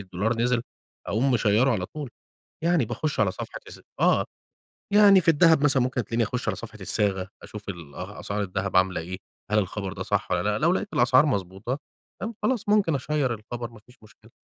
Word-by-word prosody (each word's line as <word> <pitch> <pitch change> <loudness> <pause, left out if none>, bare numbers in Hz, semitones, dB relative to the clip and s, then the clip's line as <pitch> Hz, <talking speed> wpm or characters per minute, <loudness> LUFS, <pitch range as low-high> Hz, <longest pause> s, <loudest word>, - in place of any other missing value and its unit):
الدولار 100 +5 -2
نزل 120 -1 +2 0.4
أقوم 125 +6 +1
مشيّره 115 +2 +3
على 95 -4 -2
طول. 145 +1 -7 0.5
يعني 170 -7 +3
باخُش 150 +4 -3
على 100 -3 +3
صفحة - - -7
الس - - -11 0.2
آه. - - +4 0.7
يعني 205 -2 +7
في 165 - -5
الدهب 160 -1 +5
مثلًا 135 -3 +4
ممكن 125 -1 -1
تلاقيني 115 +2 0
أخُش 125 +3 -3
على - - 0
صفحة 110 -1 -9
الصاغة، 95 -2 0
أشوف 105 -1 -10
ال 85 -7 -7
أ 95 +5 -7
أسعار 100 +1 -2
الدهب 100 0 -2
عاملة 95 -1 +3
إيه، 90 +3 -6 0.3
هل 105 - +3
الخبر 95 0 -2
ده - - -5
صح - - -1
والّا - - +1
لأ؟ - - 0
لو - - +3
لقيت - - -1
الأسعار - - +5
مضبوطة 95 +7 -2 0.4
فاهم؟ 225 +3 -4
خلاص 245 -5 0
ممكن 205 -7 +3
أشيّر 135 -2 0
الخبر 120 +2 -7
ما 110 -2 -15
فيش 125 +1 -19
مشكلة. 110 +1 -19
115 Hz, 195 wpm, -25 LUFS, 100-140 Hz, 0.7 s, يعني